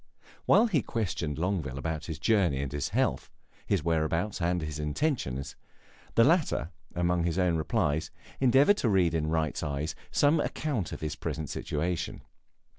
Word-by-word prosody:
While - - +6
he 180 - +2
questioned 90 -10 -2
Longueville 80 -7 -1
about 80 +1 -3
his 80 -3 -4
journey 90 -5 +2
and 70 - -4
his 75 -1 -2
health, - - 0 0.4
his 95 -6 +1
whereabouts 85 +4 0
and 90 +1 +1
his 75 -2 -5
intentions, 75 - -2 0.6
the 115 - +6
latter, 150 - +2 0.2
among 85 0 +1
his 85 +1 -1
own 90 -3 +2
replies, 80 -2 0 0.3
endeavored 135 +10 +5
to 120 - +1
read 90 -5 +3
in 80 -2 0
Wright's 80 -2 0
eyes 75 +2 -2 0.2
some 145 +2 +3
account 130 - -2
of - - -6
his 75 -1 -3
present 80 -3 -4
situation. 85 +3 -3
85 Hz, 155 wpm, -29 LUFS, 75-105 Hz, 0.6 s, While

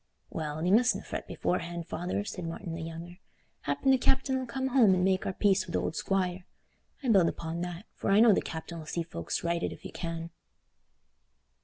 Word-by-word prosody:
"Well, 155 0 -3
thee 180 - +2
mustna 245 +4 +4
fret - - -5
beforehand, 170 -1 -2
father," 180 +4 -2
said 180 -4 -5
Martin 165 +1 -5
the 165 - -5
younger. 165 +2 -7 0.5
"Happen 145 - +2
the 265 - +5
captain 265 +1 +2
'ull 260 -1 -2
come 265 +2 -2
home 235 -8 +6
and 180 - +1
make 190 -1 +2
our 190 - -1
peace 195 -1 +2
wi' 170 - -7
th' - - 0
old 160 - -1
squire. 185 -2 0 0.6
I 255 - 0
build 190 -6 +6
upo' 165 +1 -4
that, 175 +2 -5
for - - -3
I 200 +1 +6
know 225 -1 +8
the - - +2
captain 165 0 -6
'll 155 - -11
see 170 - -1
folks 85 - -4
righted 170 0 0
if - - -10
he - - -8
can." 165 -1 -5
180 Hz, 205 wpm, -30 LUFS, 165-205 Hz, 0.6 s, know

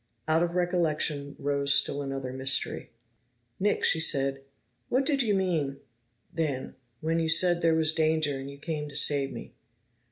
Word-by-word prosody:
Out 160 +1 +3
of 175 0 -1
recollection 155 -5 0
rose 140 0 +1
still 145 - +1
another 135 -2 -5
mystery. 130 +1 0 0.7
"Nick," 205 +2 0
she 165 - +3
said, 135 -3 +2 0.5
"what 260 +2 +1
did 280 -2 +2
you 215 -5 +1
mean 165 -8 -1 0.5
then 150 -6 -3 0.3
when 165 +1 0
you 160 -1 -1
said 175 +1 +4
there 165 -1 +3
was 160 -1 +3
danger 155 -3 +1
and 135 +1 -7
you 140 - -10
came 150 0 -5
to 140 - -12
save 140 -2 +2
me?" - - -9
155 Hz, 160 wpm, -27 LUFS, 140-170 Hz, 0.7 s, said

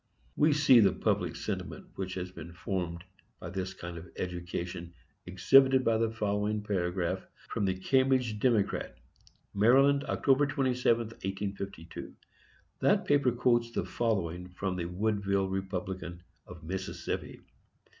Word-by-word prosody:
We 150 +1 +4
see 140 -4 +6
the 100 - +5
public - - 0
sentiment - - -5
which 95 -1 -4
has 90 -1 -4
been 85 -1 -10
formed 85 -1 -3 0.4
by 85 - -7
this 95 0 -4
kind 85 -2 -7
of 90 - -12
education 85 -1 -5 0.3
exhibited 130 +9 +5
by 115 -1 +3
the 115 0 +2
following 105 -1 -1
paragraph 90 -2 -1 0.3
from 100 - -1
the 95 -1 +1
Cambridge 130 +1 +2
Democrat, 110 -4 +1 0.6
Md., 135 +7 +4
Oct. 140 +1 +2
27, 130 -4 +2
1852. 100 -5 -6 0.6
That - - +3
paper 145 -3 +3
quotes 120 -1 +2
the 115 - -2
following 90 -6 -1
from 90 +1 -3
the 85 -2 -3
Woodville 100 +1 0
Republican, 95 -2 -4 0.2
of 90 -3 -11
Mississippi. 95 +3 -4
100 Hz, 125 wpm, -30 LUFS, 90-120 Hz, 0.6 s, see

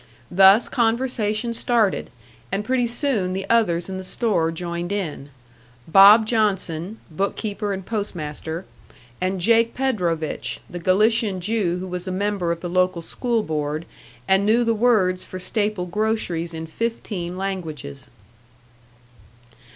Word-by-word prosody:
Thus 195 +5 +6
conversation 230 -2 0
started; 230 -4 +1 0.4
and 200 +2 -2
pretty 250 0 +1
soon 235 -7 0
the 190 +1 -4
others 175 -8 +2
in 190 -1 -5
the - - -6
store 185 -5 0
joined 170 +1 -4
in 160 -8 -4 0.6
"Bob" 200 +6 +8
Johnson, 205 -4 -1
bookkeeper 200 +4 -2
and 190 -1 -4
post 210 -3 -3
master, 160 +2 -5 0.6
and 185 +1 -1
"Jake" 230 +4 +3
Predovich, 180 - -1
the 175 - -7
Galician 205 +2 +2
Jew 190 -2 0
who 180 - -5
was 180 0 -5
a - - -2
member 195 -2 -1
of 170 0 -3
the 175 - -4
local 180 -1 +1
school 235 +4 -1
board, 155 0 -3 0.4
and 190 +1 +4
knew 225 +4 +3
the 230 -1 +2
words 210 -6 +2
for 185 - -8
staple 205 0 -1
groceries 180 -4 -2
in 160 0 -5
fifteen 185 -2 -4
languages. 155 -9 -5
195 Hz, 135 wpm, -22 LUFS, 175-220 Hz, 0.6 s, Bob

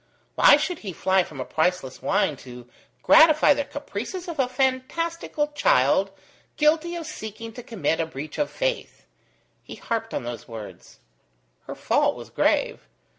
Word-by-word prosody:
Why - - +7
should 360 -3 -3
he 195 -4 -7
fly 190 +3 +2
from 155 -5 -8
a 130 - -3
priceless 160 -5 -1
wine 150 - +1
to 125 -2 -12 0.4
gratify 310 -2 +6
the 285 - -2
caprices 285 - -6
of 335 -4 -6
a 255 -2 +2
fantastical 295 +4 -1
child 190 - +2 0.5
guilty 320 +3 +2
of 335 -2 -5
seeking 225 -6 -8
to 245 - -8
commit 185 -9 -2
a 165 - 0
breach 150 0 -8
of 295 - 0
faith? - - -3 0.6
He - - -10
harped 225 -1 -4
on - - -3
those 120 -2 -7
words. 110 - -11 0.7
Her - - -6
fault - - +1
was - - -11
grave. - - 0
230 Hz, 155 wpm, -24 LUFS, -, 0.7 s, Why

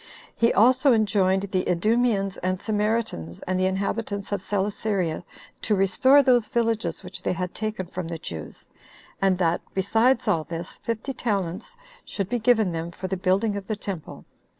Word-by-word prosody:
He 230 - +3
also 255 +6 +5
enjoined 195 -3 +2
the 185 -1 +1
Idumeans 205 +1 +1
and 185 0 -1
Samaritans, 210 - -2
and 185 0 -1
the 185 - +3
inhabitants 200 +1 -2
of 200 -2 -1
Celesyria, 195 -3 -1 0.4
to 210 - +1
restore 260 +9 +5
those 245 -4 +3
villages 230 -3 -1
which 185 +1 -7
they - - 0
had 180 0 -4
taken 215 -3 -3
from 180 0 -6
the 165 0 -4
Jews; 80 - -8 0.5
and 190 -2 +3
that, 170 -2 +1
besides 225 +6 +2
all 160 -2 +2
this, 165 +1 -7
fifty 230 +4 -3
talents 205 - -3 0.3
should 195 -2 -4
be 245 - 0
given 220 -4 +3
them 165 0 -3
for 180 +2 -6
the 190 - -2
building 195 +4 +1
of 200 -1 -6
the 215 - -1
temple. 195 -5 -6
200 Hz, 165 wpm, -25 LUFS, 185-225 Hz, 0.5 s, also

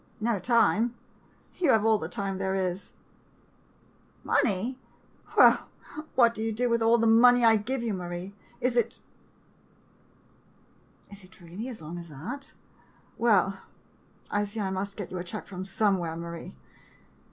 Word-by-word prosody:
No 225 -2 0
time? 230 +2 +2 0.6
You 340 -5 +2
have 220 -3 +4
all 220 -1 +4
the - - -5
time 195 -3 -3
there 190 0 -1
is. 185 0 -3 1.3
Money? 230 +6 0 0.6
Why, - - +7 0.6
what 235 -2 +5
do 220 - -6
you 225 0 -1
do 240 +2 0
with 235 0 +2
all 225 +1 +5
the 230 - +1
money 240 +2 +6
I 225 -1 +7
give 235 +4 -3
you, 225 -3 -1
Marie? 180 +1 -6 0.3
Is 250 -1 0
it 240 - +1 1.1
— - - -33
is 200 -1 -12
it 185 +1 -17
really 180 +7 -7
as 225 -10 -9
long 170 +3 -6
as 170 -1 -10
that? 245 - -8 0.7
Well, 195 -4 +2 0.7
I 205 0 +1
see 205 +2 -7
I 195 -2 -1
must 195 +1 -4
get 205 - -6
you 185 - -4
a - - -4
check 195 +4 -7
from 185 -1 -7
somewhere, 190 -5 0
Marie. 170 - -8
205 Hz, 155 wpm, -27 LUFS, 185-235 Hz, 1.3 s, Why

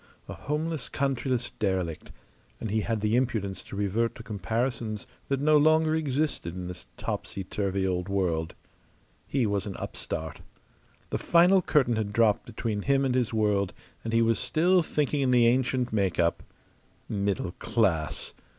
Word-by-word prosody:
A - - -6
homeless, 150 0 -3
countryless 130 -2 -1
derelict, 95 -6 -1 0.5
and 110 - -4
he 110 0 +1
had 110 0 -1
the 105 +2 +2
impudence 110 -7 0
to - - -10
revert 105 +4 0
to 115 - -9
comparisons 110 +1 -2 0.2
that 135 -1 0
no 150 +2 +5
longer 155 +1 +4
existed 145 - -1
in 90 -1 -5
this 90 0 -8
topsy 95 - -4
turvy 95 0 -1
old 90 0 -1
world. 85 -5 0 0.7
He 135 -4 +1
was 100 -1 -1
an 100 - -5
upstart. 80 0 -5 0.7
The - - -1
final 180 +3 +5
curtain 130 -9 +2
had 105 -2 -2
dropped 110 -2 +3
between 110 -2 -3
him 135 +3 +2
and 130 - +1
his 125 -3 +1
world, 105 -4 +1 0.3
and 115 - -3
he 115 0 +4
was 115 -2 +2
still 170 +8 +3
thinking 150 -2 0
in 135 - +2
the 125 -2 +5
ancient 125 0 +2
make 95 -5 +1
up. 85 -1 +2 0.7
Middle 100 -3 -1
class! 85 - 0
115 Hz, 160 wpm, -28 LUFS, 100-135 Hz, 0.7 s, no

